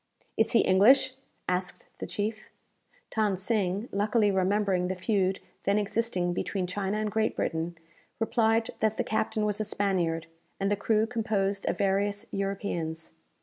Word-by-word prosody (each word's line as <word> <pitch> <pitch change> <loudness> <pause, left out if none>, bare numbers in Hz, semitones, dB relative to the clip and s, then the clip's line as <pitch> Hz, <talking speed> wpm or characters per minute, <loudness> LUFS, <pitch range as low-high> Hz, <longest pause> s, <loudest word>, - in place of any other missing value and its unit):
"Is 220 - +2
he 230 - +6
English?" 255 +8 +5 0.3
asked 180 0 -2
the - - -4
chief. 215 +1 -3 0.7
Than 210 -4 +2
Sing, 200 +1 0
luckily 210 +1 +2
remembering 190 -1 +1
the 185 - -2
feud 190 -1 0 0.2
then 200 +1 +2
existing 205 -4 0
between 185 +1 -2
China 195 +2 -2
and 215 -1 -1
Great 220 0 +1
Britain, 165 +1 -2 0.4
replied 225 0 +2
that 220 0 +1
the - - +1
captain 220 0 0
was 210 0 0
a - - +1
Spaniard, 180 -6 0 0.3
and 195 +1 0
the - - +3
crew 215 +2 +2
composed 210 -4 -1
of - - 0
various 200 +2 0
Europeans. 190 -5 -3
200 Hz, 150 wpm, -28 LUFS, 190-215 Hz, 0.7 s, he